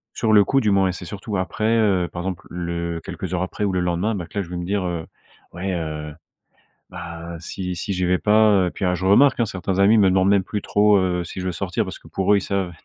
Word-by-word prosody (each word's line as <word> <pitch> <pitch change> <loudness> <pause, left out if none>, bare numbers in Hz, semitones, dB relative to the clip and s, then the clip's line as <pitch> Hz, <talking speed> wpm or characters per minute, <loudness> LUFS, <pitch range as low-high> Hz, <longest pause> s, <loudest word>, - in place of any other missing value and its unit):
Sur 110 -1 0
le 105 -2 +6
coup 135 +5 +2
du 105 - +2
moins. 95 -1 +3
Et 90 - -1
c'est 90 - -8
surtout 100 +3 -6
après, 95 +3 -2
heu, 95 -5 +2
par 85 - -5
exemple, 95 -1 -5
le 85 -1 -4
quelques 95 -1 -6
heures 90 - 0
après 100 +3 -3
ou 100 - -1
le 90 - 0
lendemain, 90 +5 0
ben 90 -3 -4
que 105 - -10
là - - -1
je - - -15
vais 90 - -5
me 90 - -4
dire, 95 +1 -1
heu: 85 -2 -3 0.5
«Ouais, 95 +2 -4
heu, 75 -3 -4 0.8
ben, 85 0 -8
si 90 +2 -5
si 95 +3 -3
j'y 90 0 -1
vais 90 +1 +2
pas, 110 +2 +4 0.2
heu», - - -2
puis - - -3
alors 90 -1 +2
je 90 +1 -3
remarque, 130 +7 +5
hein, 115 - +2
certains 95 -1 -3
amis 100 +3 +5
me 100 -3 +5
demandent 95 +1 +3
même 100 -1 +3
plus 105 +2 -3
trop, 105 +1 +3
heu, 90 -2 0
si 90 - -7
je 90 - -4
veux 90 - -1
sortir - - -2
parce - - -7
que - - -19
pour 95 +2 +2
eux - - +5
ils 100 - 0
savent 95 -3 -2
95 Hz, 275 wpm, -22 LUFS, 85-100 Hz, 0.8 s, le